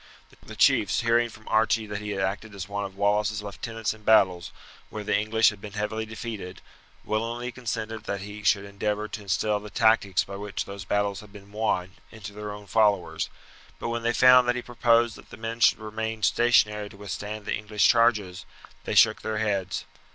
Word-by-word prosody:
The - - -10
chiefs, 100 +3 +3
hearing 120 0 +2
from 110 -1 -15
Archie 110 0 +2
that 105 -1 -5
he 105 - -5
had 100 -2 -2
acted 100 +2 -3
as 95 -1 -6
one 100 0 -3
of 95 -1 -9
Wallace's 105 +1 +1
lieutenants 110 +2 -4
in 110 - -16
battles 95 -5 +3 0.4
where 105 - -6
the 105 - 0
English 110 +2 +3
had 105 -2 -13
been 105 -1 -9
heavily 110 +1 -3
defeated, 110 -5 -7 0.5
willingly 115 +3 -2
consented 115 -2 -5
that 100 -3 -3
he 105 +1 -8
should 100 -1 +2
endeavour 105 +1 -2
to 110 - -7
instil 105 +2 0
the 105 +1 -10
tactics 110 -5 +3
by 100 0 -8
which 105 0 -4
those 100 -1 -8
battles 100 0 0
had 105 -2 -13
been 100 0 -14
won 105 -4 -1 0.2
into 105 -2 -10
their 105 0 -6
own 105 0 -9
followers; 105 -3 +1 0.5
but - - -4
when 120 0 -2
they 115 +1 +1
found 125 +1 +6
that 125 - +2
he 125 - -4
proposed 120 -1 +2
that - - -16
the - - -11
men 115 +1 -5
should 105 - +5
remain 110 0 -5
stationary 105 -3 +3
to 100 - -15
withstand 105 +1 -6
the - - -2
English 105 0 +1
charges, 105 -6 +2 0.4
they - - -2
shook - - +5
their 110 0 -3
heads. 100 -4 -1
105 Hz, 195 wpm, -26 LUFS, 100-115 Hz, 0.5 s, found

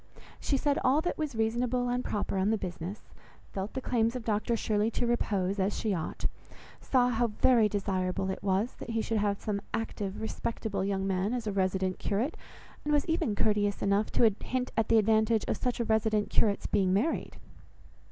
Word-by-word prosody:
She 275 - 0
said 285 +1 +1
all 265 +4 +4
that 350 - -1
was 300 -5 -2
reasonable 240 +3 0
and 245 +1 0
proper 200 -2 -2
on 190 +2 +2
the 220 - +2
business; 180 +1 -6 0.4
felt 195 +2 -4
the 265 - -2
claims 230 -1 +1
of 250 - -4
Dr 220 +2 0
Shirley 215 0 +1
to 230 - -1
repose 200 -5 0
as 195 +2 0
she 215 -3 0
ought; 165 -4 -4 0.5
saw 250 -2 +2
how 240 0 +1
very 225 0 +4
desirable 190 -2 -1
it - - -5
was 200 +4 0
that - - -7
he 225 -1 0
should 225 -1 0
have 205 -1 0
some 205 -2 -2
active, 205 -3 -4
respectable 220 -2 -3
young 195 -1 -1
man, 195 +4 0
as 240 -2 -3
a 210 - -1
resident 190 -1 0
curate, 225 - -1 0.5
and 295 - -1
was 295 -1 +3
even 320 -10 0
courteous 205 -1 +1
enough 200 +2 +2
to 225 -3 +4
hint 255 0 -2
at 225 - +1
the 225 - +5
advantage 220 +1 +3
of - - +1
such 250 -2 -2
resident 220 -2 +1
curate's 205 -3 +2
being 190 -3 +2
married. 225 +12 0
215 Hz, 190 wpm, -30 LUFS, 200-235 Hz, 0.5 s, the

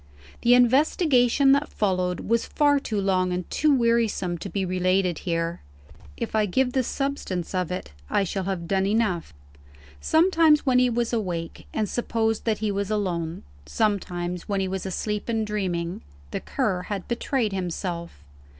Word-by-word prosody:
The 245 +1 +6
investigation 265 +1 +4
that 280 +2 +2
followed 185 -3 0
was 230 +1 0
far 290 -1 +3
too 215 -6 -3
long 185 -2 +1
and 180 0 -3
too 305 - +2
wearisome 230 -8 +1
to 195 - -6
be 195 -1 -1
related 185 -1 +1
here. 165 0 -1 0.6
If 230 - -4
I 215 -1 +2
give 250 +6 +1
the 265 - +3
substance 255 - -3
of 180 -2 -1
it, 180 - -5 0.2
I 200 - +2
shall 195 0 -3
have 185 -3 -3
done 195 +1 +1
enough. 205 - 0 0.7
Sometimes 320 - +4
when 255 -2 +4
he 250 0 +4
was 235 0 -1
awake, 175 -7 -3
and 215 - -1
supposed 225 -1 -1
that 220 -2 +1
he 215 -1 -1
was 200 0 -2
alone 175 -6 -2 0.2
sometimes 180 -5 -1
when 200 -1 0
he 190 - 0
was 190 0 -3
asleep 210 +4 -3
and 225 -1 0
dreaming 180 -5 -2 0.3
the - - -2
Cur 210 -10 -1
had 195 0 -5
betrayed 235 -2 -1
himself. 175 - -4
205 Hz, 160 wpm, -25 LUFS, 180-235 Hz, 0.7 s, The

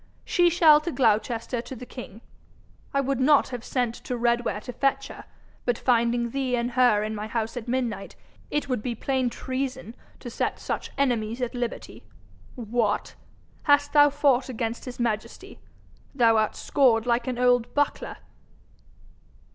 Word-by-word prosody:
She 350 -1 +3
shall 315 -3 +6
to 340 - -3
Gloucester 230 -1 0
to 260 - -9
the 250 - -9
king. 235 -4 -10 0.7
I 275 - +1
would 275 -1 -1
not 285 +2 +4
have 245 -2 -6
sent 245 -3 -1
to 245 +1 -5
Redware 235 -2 0
to 250 - -8
fetch 275 +1 0
her, - - -10 0.4
but 245 -2 0
finding 235 -1 +1
thee 265 -1 -1
and 240 +1 -1
her 240 -4 +3
in 215 0 -3
my 210 0 -5
house 225 +1 -3
at 245 -1 -6
midnight, 235 -5 -3 0.3
it 295 -1 -1
would 255 -5 -1
be 240 0 -3
plain 260 +1 0
treason 260 -1 -4 0.3
to 240 - -8
set - - -2
such - - -4
enemies 235 -4 0
at 245 -2 -2
liberty. 245 -1 -5 0.5
What! 225 -3 -1 0.6
hast 290 0 +4
thou 290 -1 +7
fought 275 -3 +2
against 230 -1 -4
his 250 -1 -8
majesty? 220 -3 -3 0.6
Thou 230 -4 +4
art 215 -1 +1
scored 245 -5 +2
like 240 0 0
an 250 -2 -2
old 245 -1 +2
buckler!' 290 0 -1
245 Hz, 160 wpm, -25 LUFS, 230-265 Hz, 0.7 s, thou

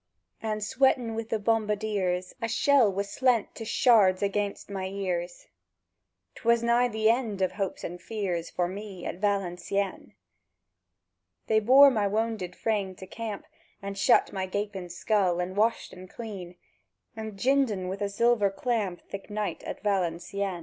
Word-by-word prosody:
And, 215 -1 -2
sweatèn 255 -1 +2
wi' 225 0 -4
the 225 - +1
bombardiers, 210 -4 0
A 230 - 0
shell 260 -2 +4
was 200 +1 -2
slent 245 0 +1
to 225 - -7
shards 210 -5 +4
anighst 200 0 -1
my 195 -2 -4
ears: 180 -3 -3 0.9
—'Twas 235 0 +2
nigh 235 +1 +3
the 220 -2 0
end 230 -5 -2
of 185 - +1
hopes 195 0 -4
and 175 +1 -6
fears 185 -7 -3
For 175 -1 -1
me 195 0 -7
at 180 - -5
Valencieën! 195 -1 -1 1.3
They 220 0 +3
bore 270 +6 +7
my 210 -5 +1
wownded 210 -4 -2
frame 200 -4 -1
to 190 - -10
camp, 215 0 -6 0.3
And 200 0 -6
shut 195 - +3
my 190 -1 -2
gapèn 200 -2 -4
skull, 180 0 +1
and 180 +1 -3
washed 220 +3 +1
en 185 0 -11
cleän, 190 -5 -8 0.6
And 220 -2 -6
jined 270 +4 +3
en 185 -3 -3
wi' 190 +2 -3
a 200 0 -2
zilver 220 0 +3
clamp 200 -4 -2
Thik 195 +2 -8
night 210 0 -3
at - - -6
Valencieën. 190 -1 -1
205 Hz, 155 wpm, -28 LUFS, 185-225 Hz, 1.3 s, bore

